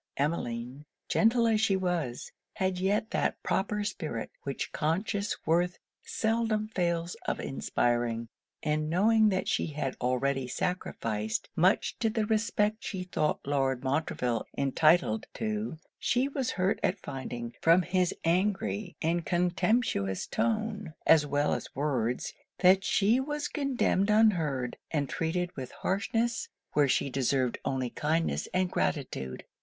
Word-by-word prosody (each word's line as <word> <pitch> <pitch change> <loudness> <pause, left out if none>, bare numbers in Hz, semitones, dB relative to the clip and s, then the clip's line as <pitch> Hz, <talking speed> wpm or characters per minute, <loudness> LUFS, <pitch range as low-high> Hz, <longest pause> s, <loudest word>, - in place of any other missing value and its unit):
Emmeline, 130 -3 -2 0.2
gentle 230 +1 +3
as 220 -2 +3
she 210 -3 +3
was, 175 -10 -2 0.2
had 185 -1 0
yet 205 +4 +1
that - - +1
proper 210 +2 0
spirit 155 - -4
which 140 -1 -4
conscious 195 +6 -1
worth 175 +2 +2 0.2
seldom 220 -1 0
fails 170 -3 -1
of - - 0
inspiring: 120 -3 0 0.4
and 155 0 0
knowing 215 +5 +4
that 185 -2 -1
she - - +1
had 145 -4 -3
already 130 +1 0
sacrificed 110 -9 -2
much 185 +4 +2
to 225 -2 +2
the 220 -1 0
respect 215 -1 +1
she 190 -3 -3
thought 155 -4 -1
Lord 135 -2 0
Montreville 130 -4 -1
entitled 140 -3 +3
to, 215 -5 -2 0.2
she 250 +2 +2
was 270 -3 -2
hurt 185 +2 0
at 185 - +1
finding, 120 -7 -6
from 170 +3 +5
his 180 0 +1
angry 190 +2 0
and 170 +1 +1
contemptuous 175 - +1
tone, 215 -6 -1
as 150 -2 +6
well 145 +1 +1
as - - -5
words, 125 -5 -1 0.2
that 190 +1 +5
she 215 +5 +3
was 295 +2 -2
condemned 260 - +1
unheard, 165 - +2
and 145 -3 0
treated 175 +5 -2
with 130 -3 -5
harshness 225 +4 -1 0.2
where 145 -1 +4
she 135 - +1
deserved 130 -1 +1
only 130 -2 -1
kindness 160 +2 0
and 185 0 +1
gratitude. 65 - -2
175 Hz, 130 wpm, -29 LUFS, 135-210 Hz, 0.4 s, as